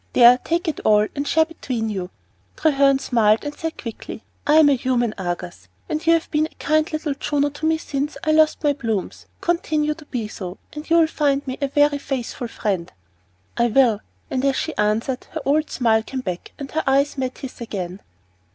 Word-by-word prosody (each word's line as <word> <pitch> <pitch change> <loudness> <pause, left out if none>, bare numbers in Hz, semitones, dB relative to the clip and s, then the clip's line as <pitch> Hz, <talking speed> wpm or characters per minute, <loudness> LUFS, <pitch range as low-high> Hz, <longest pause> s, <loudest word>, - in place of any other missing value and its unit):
There, 245 +1 +7
take 335 +6 -1
it 315 - -1
all, 210 0 +4
and 285 0 -2
share 320 0 +4
between 255 -8 -4
you." 190 -4 -3 0.5
Treherne 275 -3 +4
smiled, 225 -5 +2
and 290 - -4
said 325 0 -4
quickly, 230 -1 -7 0.2
"I 300 - +5
am 315 -1 +7
a 285 - +5
human 240 -3 0
Argus, 175 - -5 0.2
and 310 - -2
you 330 - +7
have 330 -1 0
been 305 0 +2
a - - -27
kind 310 +1 +1
little 310 -2 -2
Juno 290 +1 0
to 300 +2 -3
me 320 0 +3
since 290 -1 -3
I 310 - +2
lost 310 0 +3
my 290 -1 +3
plumes. 225 -8 -3
Continue 310 -3 0
to 310 0 -15
be 240 -6 -3
so, 185 -3 -7 0.2
and 300 +1 -8
you 335 - +5
will 330 - +6
find 285 -3 0
me 260 -1 -5
a 280 - +1
very 290 +1 +3
faithful 260 -3 -4
friend." 195 -6 -2 0.6
"I 235 - +3
will." 235 -3 +4 0.3
And 260 0 -1
as 275 -1 +2
she 320 - -2
answered, 220 +5 0
her 315 - -3
old 305 +2 +2
smile 225 -3 +2
came 260 +3 -5
back 180 -6 -5
and 280 -2 -7
her 320 - -1
eyes 275 +2 +3
met 260 -1 -2
his 265 -2 -9
again. 190 -4 -5
275 Hz, 205 wpm, -22 LUFS, 225-305 Hz, 0.6 s, There